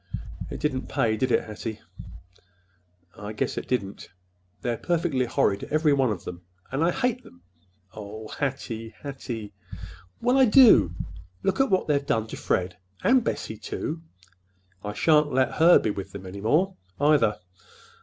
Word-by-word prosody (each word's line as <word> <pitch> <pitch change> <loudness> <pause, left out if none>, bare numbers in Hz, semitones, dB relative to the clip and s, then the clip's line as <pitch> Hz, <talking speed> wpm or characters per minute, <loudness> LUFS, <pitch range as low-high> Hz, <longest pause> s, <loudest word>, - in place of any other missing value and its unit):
"It - - -6
didn't 130 -4 -1
pay, 110 -2 +1
did 125 +4 0
it, - - +3
Hattie?" 110 0 -6 1.4
"I 105 +1 -7
guess 105 - -2
it - - -5
didn't! 100 -6 -3 0.5
They're 120 -1 0
perfectly 165 -7 0
horrid—every 145 +8 +1
one 135 -3 +2
of 95 -5 -4
them, 85 0 -7 0.3
and 135 +4 0
I 170 - +4
hate 250 +5 0
them!" 85 0 -18 0.5
"Oh, 110 +1 -8
Hattie, 120 -5 -4
Hattie!" 120 -7 -6 0.7
"Well, 250 +3 +3
I 265 - +7
do. 220 - +7 0.5
Look 195 +4 0
at 270 - +3
what 190 -2 +2
they've 145 -2 +2
done 110 -5 0
to - - -6
Fred, 90 0 -1 0.3
and 255 -1 +4
Bessie, 110 - -3
too! 160 +8 -4 0.8
I 105 0 -4
shan't 150 +3 +3
let 130 0 +1
her 170 +2 +8
be 110 - 0
with 100 -2 -7
them 95 -1 -8
any 95 +2 -7
more, 165 - +2 0.2
either. 145 -8 +3
130 Hz, 155 wpm, -26 LUFS, 105-160 Hz, 1.4 s, her